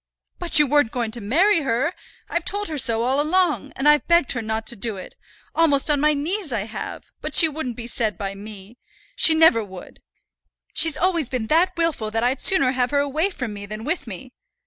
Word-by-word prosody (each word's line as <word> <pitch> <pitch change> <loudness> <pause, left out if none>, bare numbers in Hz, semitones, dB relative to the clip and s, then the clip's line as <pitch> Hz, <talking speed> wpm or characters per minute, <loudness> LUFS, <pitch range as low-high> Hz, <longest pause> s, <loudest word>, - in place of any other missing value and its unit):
"But 345 -2 +3
you 300 - +6
weren't 290 -3 +2
going 235 -2 -4
to 235 +1 -5
marry 335 - +2
her. 275 +3 -1 0.3
I've 340 - -3
told 410 +1 -1
her 310 - -4
so 230 -2 +1
all 265 +4 +1
along, 315 -3 0
and 270 - -1
I've 295 0 +3
begged 340 -5 +3
her 245 - -1
not 220 0 -4
to 235 - +1
do 215 0 -4
it, 185 - -11 0.4
almost 305 -3 +2
on 290 - +1
my 300 0 +2
knees 330 +3 -3
I 225 -4 -2
have; 215 +2 -8
but - - -4
she 330 - +8
wouldn't 290 -6 -6
be 235 - -7
said 225 -3 -2
by 195 -2 -5
me. 205 +2 -12 0.4
She 320 -9 +6
never 315 -9 +4
would. 190 -3 -13 0.7
She's 325 -2 +3
always 340 -6 0
been 250 -4 -3
that 340 +3 +2
wilful 325 -10 -1
that 225 +1 -2
I'd 250 +3 0
sooner 305 -10 +4
have 250 -1 -1
her 285 - -1
away 295 +6 -1
from 250 - -6
me 200 0 -8
than 215 +2 -7
with 315 -2 -3
me. 225 +5 -9
270 Hz, 215 wpm, -21 LUFS, 225-320 Hz, 0.7 s, she